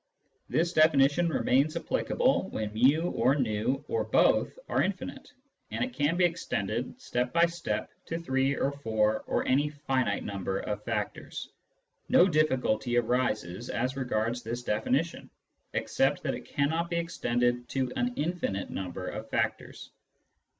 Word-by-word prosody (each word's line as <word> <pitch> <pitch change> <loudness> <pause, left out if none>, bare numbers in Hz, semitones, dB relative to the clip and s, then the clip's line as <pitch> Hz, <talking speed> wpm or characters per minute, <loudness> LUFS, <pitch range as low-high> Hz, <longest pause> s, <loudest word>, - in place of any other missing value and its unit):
This 170 +2 +1
definition 155 +1 +4
remains 145 0 +2
applicable - - +1
when 110 -1 -4
ju. 145 +9 +4
or 130 +4 +3
v 115 -2 0
or 460 - 0
both - - +3
are - - +1
infinite, - - -4 0.4
and - - -2
it 255 - -8
can 150 0 +1
be 180 - +5
extended 125 - -2
step 125 - -1
by 170 0 +5
step 170 0 -3 0.2
to 165 - -2
three 135 -4 +1
or 140 - 0
four 110 -6 0
or - - 0
any 145 +3 +3
finite 135 -7 -1
number 95 -1 -3
of 105 0 -4
factors. - - -4 0.6
No 180 - +6
difficulty 130 - +1
arises 120 -4 0
as 130 +3 -1
regards 120 -2 -1
this 120 +2 -5
definition, 105 -2 -1 0.4
except - - +1
that - - 0
it - - -7
cannot 160 +4 0
be 170 - -2
extended 120 -7 0
to 130 -2 -1
an 245 0 0
infinite 150 - -2
number 90 0 -5
of - - -6
factors. - - -2
130 Hz, 145 wpm, -29 LUFS, 110-160 Hz, 0.6 s, No